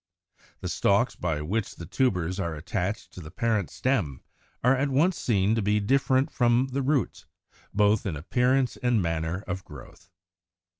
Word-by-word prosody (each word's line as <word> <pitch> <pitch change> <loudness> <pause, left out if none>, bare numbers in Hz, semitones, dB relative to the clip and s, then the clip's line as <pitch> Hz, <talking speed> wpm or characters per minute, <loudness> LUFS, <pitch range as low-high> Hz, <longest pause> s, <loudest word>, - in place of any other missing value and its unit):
The - - -4
stalks 120 +6 +2
by 80 -4 -2
which 105 +7 -2
the 85 - -8
tubers 90 - 0
are 85 -4 -2
attached 90 +6 -3
to 90 - -9
the 75 - -9
parent 110 +1 0
stem 105 - -1 0.4
are 125 +2 +5
at 140 +2 0
once 160 +7 +3
seen 100 -2 +1
to 115 - +1
be 105 +1 +2
different 130 +5 +2
from 120 +1 +2
the 140 +2 -1
roots, 135 -1 -1 0.4
both 105 +1 +2
in 85 - -2
appearance 125 - +1
and 120 -2 +1
manner 85 +1 -2
of 95 0 -4
growth. 75 +5 -13
105 Hz, 160 wpm, -27 LUFS, 90-125 Hz, 0.4 s, are